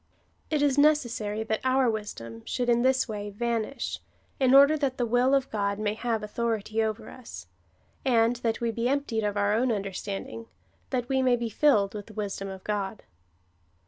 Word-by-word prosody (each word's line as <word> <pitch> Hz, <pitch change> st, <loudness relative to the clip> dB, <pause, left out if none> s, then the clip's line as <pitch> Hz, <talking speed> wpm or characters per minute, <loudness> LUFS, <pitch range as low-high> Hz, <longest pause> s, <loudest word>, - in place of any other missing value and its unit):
It 300 Hz, -2 st, +1 dB
is 285 Hz, -1 st, +3 dB
necessary 240 Hz, -8 st, +2 dB
that 220 Hz, 0 st, -1 dB
our 260 Hz, 0 st, +3 dB
wisdom 160 Hz, -, -4 dB
should 245 Hz, -1 st, -1 dB
in 240 Hz, 0 st, +4 dB
this 260 Hz, +1 st, +2 dB
way 210 Hz, -2 st, -5 dB
vanish, 230 Hz, +4 st, -2 dB, 0.4 s
in 260 Hz, -1 st, +5 dB
order 280 Hz, +3 st, +8 dB
that 275 Hz, -4 st, -1 dB
the 245 Hz, -, +1 dB
will 245 Hz, +4 st, +3 dB
of 270 Hz, -1 st, 0 dB
God 200 Hz, -2 st, -1 dB
may 210 Hz, 0 st, -1 dB
have 225 Hz, -1 st, -2 dB
authority 220 Hz, 0 st, -1 dB
over 220 Hz, 0 st, -2 dB
us, 225 Hz, -, -10 dB, 0.6 s
and 235 Hz, -1 st, +3 dB
that 230 Hz, -2 st, -1 dB
we 235 Hz, -1 st, 0 dB
be 230 Hz, +1 st, -3 dB
emj)tied 255 Hz, -4 st, 0 dB
of 205 Hz, -, -6 dB
our 205 Hz, 0 st, +2 dB
own 240 Hz, +3 st, +2 dB
under 200 Hz, -3 st, -2 dB
standing, 205 Hz, +4 st, -6 dB, 0.4 s
that 255 Hz, -2 st, 0 dB
Ave 265 Hz, +2 st, 0 dB
may 255 Hz, -1 st, +4 dB
be 235 Hz, -1 st, -3 dB
filled 210 Hz, -7 st, +3 dB
with 205 Hz, -2 st, -7 dB
the 220 Hz, -, -12 dB
wisdom 200 Hz, -2 st, -4 dB
of 190 Hz, -1 st, -9 dB
God. 205 Hz, 0 st, -3 dB
230 Hz, 185 wpm, -27 LUFS, 210-255 Hz, 0.6 s, order